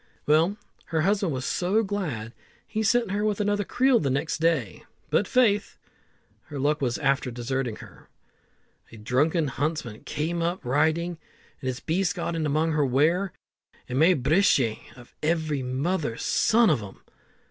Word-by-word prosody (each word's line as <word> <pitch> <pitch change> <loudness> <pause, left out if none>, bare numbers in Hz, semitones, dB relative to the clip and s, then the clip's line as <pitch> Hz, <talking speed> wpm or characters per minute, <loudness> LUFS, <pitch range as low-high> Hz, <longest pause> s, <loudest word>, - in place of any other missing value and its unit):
Well, 165 +7 +3 0.3
her 160 -1 -1
husband 195 0 +1
was 130 -1 -3
so 195 +5 +1
glad, 155 - -4 0.3
he 220 - -3
sent 230 -1 +2
her 205 +1 -1
with 215 -1 0
another 205 0 +1
creel 255 +4 +3
the 140 - -1
next 140 +5 -1
day; 165 +1 0 0.3
but - - +2
faith! 220 -5 +2 0.7
her 150 -2 -8
luck 145 +2 0
was 120 -3 0
after 140 -2 +1
deserting 125 0 -3
her. - - -14 0.8
A 115 - -11
drunken 145 +9 +1
huntsman 140 -5 -3
came 160 +3 -2
up 175 0 -2
riding, 160 +6 +1 0.4
and 130 - -4
his 130 -1 -3
beast 170 -1 0
got 170 - -3
in 160 -2 -1
among 155 +3 +1
her 150 -1 +2
ware, 160 +9 +2 0.6
and 130 +1 -2
made 160 -4 +4
brishe 140 - +3 0.2
of 120 -1 -15
every 155 -3 0
mother's 130 0 -2
son 225 -3 +3
of 135 -7 +1
'em. 100 -2 -11
155 Hz, 160 wpm, -26 LUFS, 135-185 Hz, 0.8 s, made